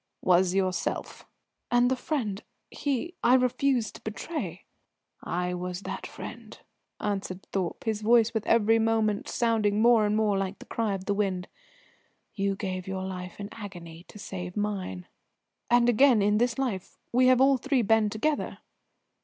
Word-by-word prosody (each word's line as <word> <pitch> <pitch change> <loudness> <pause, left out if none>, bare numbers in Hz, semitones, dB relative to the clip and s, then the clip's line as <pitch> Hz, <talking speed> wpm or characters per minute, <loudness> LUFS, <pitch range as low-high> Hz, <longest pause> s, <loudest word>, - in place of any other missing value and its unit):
"Was 180 0 +3
yourself!" 185 -1 -2 0.4
"And 245 +1 +3
the - - +3
friend 245 -7 -3 0.3
he 290 +5 -2
I 250 - +6
refused 250 -2 +1
to - - -12
betray?" 300 +9 -5 0.6
"I 180 +1 -2
was 180 +1 -4
that - - -5
friend," - - -9 0.4
answered 195 -2 -3
Thorpe, 185 -4 -2
his 220 -2 -1
voice 230 +1 +4
with 220 -2 -2
every 225 0 +4
moment 220 -2 +1
sounding 220 -3 +1
more 225 -2 +5
and 210 - +1
more 210 -3 +2
like 195 0 -3
the - - -13
cry 220 -3 -1
of 190 -1 -7
the 205 - +1
wind. 190 -3 -1 0.8
"You 195 -1 0
gave 185 -2 -4
your 190 0 -3
life 180 -1 -6
in 200 0 -5
agony 175 -6 -9
to - - -13
save 180 -2 -6
mine." 195 - -3 0.6
"And 240 0 +5
again, 245 -2 +5
in 210 +1 +3
this 240 +1 +1
life, 235 -9 -3 0.2
we 255 +1 +5
have 255 -1 +5
all 270 0 +5
three 270 -1 +1
been 220 0 +3
together?" 285 +9 -1
210 Hz, 160 wpm, -28 LUFS, 190-235 Hz, 0.8 s, I